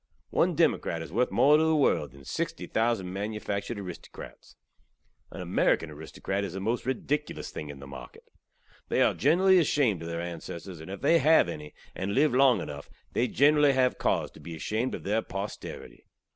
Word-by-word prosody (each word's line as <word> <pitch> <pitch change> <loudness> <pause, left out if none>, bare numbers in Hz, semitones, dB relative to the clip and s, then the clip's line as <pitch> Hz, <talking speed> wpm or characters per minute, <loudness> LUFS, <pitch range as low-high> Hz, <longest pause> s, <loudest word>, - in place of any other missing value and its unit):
One - - +2
democrat 85 -1 +1
iz - - -10
worth 120 +7 +1
more 145 +2 +5
tew 155 - +3
the 160 - +3
world 145 - +2
than 70 -1 -15
60 - - -3
thousand 110 -5 0
manufaktured 105 +2 -3
aristokrats. 90 -4 -10 0.7
An - - -7
Amerikan 80 - +1
aristokrat 80 +6 -4
iz 95 -4 -4
the 95 - -4
most 115 +6 -1
ridikilus 145 +3 -2
thing 75 - -6
in 70 - -8
market. 70 0 -11 0.7
They - - +3
are - - +3
generally 190 +2 +4
ashamed 135 - +2
ov 85 - -6
their 85 0 -3
ansesstors; 85 0 -7
and, 80 - -10
if 95 0 -7
they 170 - +4
hav 155 - +5
enny, 75 -3 -7 0.2
and 100 +2 -3
live 145 0 +3
long 130 -1 +5
enuff, 70 -1 -7 0.2
they 125 - +1
generally 145 +1 +4
hav 130 -1 +2
cauze - - 0
tew - - -15
be 85 - -8
ashamed 110 +10 -2
ov - - -9
their 105 +3 +1
posterity. 100 0 -7
105 Hz, 180 wpm, -28 LUFS, 85-135 Hz, 0.7 s, more